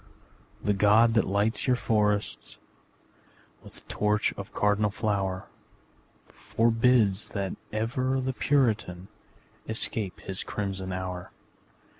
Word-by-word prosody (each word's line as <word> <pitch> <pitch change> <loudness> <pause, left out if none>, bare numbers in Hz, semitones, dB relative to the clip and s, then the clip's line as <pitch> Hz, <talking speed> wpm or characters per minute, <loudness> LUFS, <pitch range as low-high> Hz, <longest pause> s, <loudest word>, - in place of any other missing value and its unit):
The 105 - +2
God 105 +3 +5
that 110 - +2
lights 100 +6 0
your 125 - +4
forest 105 - -1 1.0
With - - -15
torch 105 0 +1
of - - -8
cardinal 105 0 +2
flower, 100 -3 -2 0.8
Forbids 115 -3 +2
that 100 -1 -2 0.2
ever 130 +5 -1
the 130 0 -2
Puritan 110 -10 0 0.6
Escape 110 -3 -2
his 95 -1 -3
crimson 95 -2 -4
hour. 90 -1 -5
105 Hz, 100 wpm, -27 LUFS, 95-115 Hz, 1.0 s, God